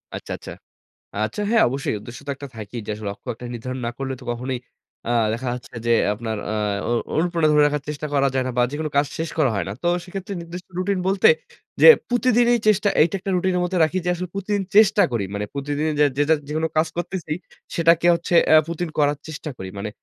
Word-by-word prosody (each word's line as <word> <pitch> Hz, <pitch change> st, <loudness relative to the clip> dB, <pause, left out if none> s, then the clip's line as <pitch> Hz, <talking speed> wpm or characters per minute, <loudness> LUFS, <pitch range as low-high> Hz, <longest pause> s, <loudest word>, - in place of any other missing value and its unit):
আচ্ছা, -, -, -7 dB
আচ্ছা। -, -, -10 dB, 0.7 s
আচ্ছা, 110 Hz, -, -4 dB
হ্যাঁ। 230 Hz, -1 st, +5 dB
অবশ্যই 135 Hz, 0 st, -2 dB
উদ্দেশ্য 120 Hz, +3 st, -10 dB
তো -, -, -2 dB
একটা 140 Hz, +1 st, -8 dB
থাকেই 110 Hz, +2 st, -6 dB
যে, -, -, -4 dB
আসলে 105 Hz, 0 st, -8 dB
লক্ষ্য 100 Hz, 0 st, -11 dB
একটা 120 Hz, +2 st, -9 dB
নির্ধারণ 130 Hz, +2 st, -5 dB
না -, -, -1 dB
করলে 135 Hz, -1 st, -3 dB
তো -, -, -12 dB
কখনোই 125 Hz, +2 st, -3 dB, 0.5 s
আ -, -, 0 dB, 0.2 s
দেখা 125 Hz, +3 st, -3 dB
যাচ্ছে 125 Hz, 0 st, -10 dB
যে -, -, +1 dB, 0.2 s
আপনার 110 Hz, 0 st, -4 dB
আ -, -, -1 dB, 0.3 s
অনু 120 Hz, 0 st, +2 dB, 0.2 s
অনুপ্রেরনা 170 Hz, -1 st, +2 dB
ধরে 150 Hz, 0 st, +5 dB
রাখার 150 Hz, -1 st, -1 dB
চেষ্টা 150 Hz, 0 st, -4 dB
করা 140 Hz, -1 st, +3 dB
যায় 130 Hz, -1 st, +1 dB
না -, -, -1 dB
বা, -, -, +5 dB
যেকোনো 155 Hz, +2 st, -3 dB
কাজ 145 Hz, +1 st, +4 dB
শেষ 165 Hz, +1 st, -2 dB
করা 140 Hz, -5 st, +3 dB
হয় 100 Hz, -, -1 dB
না। -, -, -3 dB
তো -, -, -2 dB, 0.2 s
সেক্ষেত্রে 195 Hz, +2 st, -6 dB
নির্দিষ্ট 170 Hz, +2 st, -9 dB
রুটিন 190 Hz, +1 st, 0 dB
বলতে 195 Hz, 0 st, +4 dB, 0.5 s
যে -, -, +9 dB, 0.2 s
প্রতিদিনই 245 Hz, -1 st, +3 dB, 0.2 s
চেষ্টা 210 Hz, -1 st, +3 dB
এইটা 160 Hz, +5 st, +4 dB
একটা 195 Hz, +1 st, -4 dB
রুটিনের 180 Hz, 0 st, +1 dB
মধ্যে 180 Hz, +1 st, -1 dB
রাখি 170 Hz, +4 st, -1 dB
যে, -, -, -1 dB
আসলে 180 Hz, +1 st, -5 dB
প্রতিদিন 200 Hz, +1 st, -1 dB
চেষ্টা 210 Hz, -1 st, +6 dB
করি। 115 Hz, -4 st, 0 dB
মানে 105 Hz, 0 st, -2 dB
প্রতিদিনই 145 Hz, +2 st, -1 dB
যে -, -, +7 dB
যেটা 145 Hz, +2 st, +4 dB
যেকোনো 155 Hz, +2 st, -1 dB
কাজ 155 Hz, +1 st, +3 dB
করতেছি 175 Hz, -2 st, -4 dB, 0.4 s
সেটাকে 170 Hz, 0 st, +4 dB
হচ্ছে 170 Hz, +1 st, -2 dB, 0.2 s
আ -, -, +8 dB
প্রতিদিন 170 Hz, 0 st, -3 dB
করার 145 Hz, -1 st, +3 dB
চেষ্টা 155 Hz, 0 st, -6 dB
করি। 95 Hz, -, -6 dB
মানে 105 Hz, +2 st, -3 dB
155 Hz, 215 wpm, -22 LUFS, 130-180 Hz, 0.7 s, যে